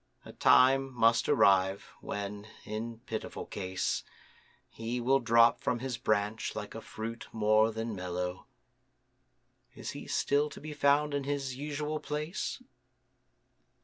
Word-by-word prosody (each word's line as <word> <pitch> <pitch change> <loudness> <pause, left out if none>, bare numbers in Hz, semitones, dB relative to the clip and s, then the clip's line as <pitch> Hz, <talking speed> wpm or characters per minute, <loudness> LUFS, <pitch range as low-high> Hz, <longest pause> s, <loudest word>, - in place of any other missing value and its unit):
A - - -10
time 135 +1 +5
must 115 0 +3
arrive 95 0 +3
when, 100 +1 -5 0.2
in 115 +2 -5
pitiful 110 -3 -5
case, 95 -2 -2 0.6
He 115 +2 -4
will 135 +3 +3
drop 115 -1 +5
from 125 - 0
his 125 0 -4
Branch 105 +1 0
like - - -5
a - - -7
fruit 115 +1 -6
more 110 0 +3
than 115 +1 -4
mellow: 90 0 -4 1.3
Is - - -5
he - - -8
still 145 +1 +1
to 140 - -10
be 155 0 -7
found 145 +1 +3
in 140 -1 -1
his 140 -2 -2
usual 150 +2 -3
place? 155 +12 -4
115 Hz, 130 wpm, -31 LUFS, 105-140 Hz, 1.3 s, time